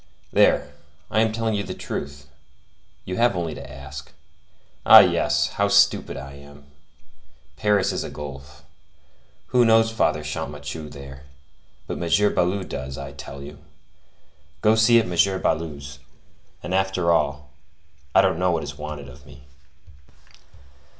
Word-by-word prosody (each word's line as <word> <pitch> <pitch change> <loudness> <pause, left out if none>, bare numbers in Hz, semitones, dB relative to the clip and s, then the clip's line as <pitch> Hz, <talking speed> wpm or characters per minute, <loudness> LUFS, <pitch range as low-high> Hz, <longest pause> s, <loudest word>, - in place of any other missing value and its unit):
There, - - +3 0.4
I 110 - +2
am 110 -1 +2
telling 110 -2 -1
the - - -6
truth; 70 +1 -6 0.8
you 90 - -4
have 120 -4 +3
only 85 -3 -3
to 70 -1 -10
ask. 70 0 -10 0.7
Ah, - - +10
yes! - - +1
how 100 - 0
stupid 100 -6 +3
I 70 0 -8
am! 70 0 -14 0.9
Paris 105 -2 +1
is - - -3
a - - -6
gulf. 70 -1 -10 0.9
Who 125 -1 +4
knows 115 0 +4
Father 75 -8 0
Champmathieu 75 0 -6
there? 70 -1 -11 0.6
But - - -5
M. 85 +5 +2
Baloup 95 +2 0
does, 65 +1 -6
I 70 0 -7
tell 70 0 -10
you. 70 +1 -11 1.0
Go 110 - +4
see 110 +1 +5
at 115 - 0
M. 95 +2 +1
Baloup's; 70 -3 -3 0.6
and 90 - -4
after 95 -2 +1
all, 75 -3 0 0.6
I - - +8
don't 80 - +1
know 90 0 +2
what 85 -2 0
is - - -8
wanted 75 -2 -7
of 60 - -15
me." 70 - -15
80 Hz, 140 wpm, -23 LUFS, 70-100 Hz, 1.0 s, Ah